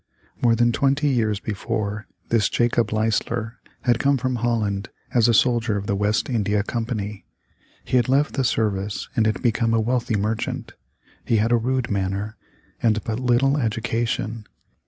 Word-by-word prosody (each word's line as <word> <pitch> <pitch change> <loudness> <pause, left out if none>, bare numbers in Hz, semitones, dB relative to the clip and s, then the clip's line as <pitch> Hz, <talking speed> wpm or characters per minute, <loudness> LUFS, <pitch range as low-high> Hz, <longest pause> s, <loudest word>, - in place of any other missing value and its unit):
More 115 -1 +4
than 120 +1 +3
twenty 140 +4 +2
years 110 -6 +1
before, 110 0 -3 0.2
this 110 -3 +3
Jacob 120 -2 +1
Leisler 110 +1 -1 0.2
had 120 -2 +2
come 140 0 +3
from 130 0 -1
Holland 110 -4 -1 0.2
as 120 -2 +4
a 120 - +4
soldier 115 -2 +2
of 100 - -4
the 100 - 0
West 105 +2 +1
India 105 -4 0
Company. 110 -3 -4 0.6
He 130 - +2
had 120 0 +2
left 140 +3 +2
the 135 - 0
service 105 -4 -1
and 110 -3 +3
had 110 0 -1
become 115 -1 +2
a - - +3
wealthy 120 0 0
merchant. 110 +2 -2 0.5
He 115 - +2
had 110 +2 +1
a - - +6
rude 125 +1 0
manner, 100 +2 -2 0.5
and 110 -3 +2
but 110 +1 -3
little 130 +3 +2
education. 115 -1 -2
115 Hz, 160 wpm, -23 LUFS, 105-120 Hz, 0.6 s, a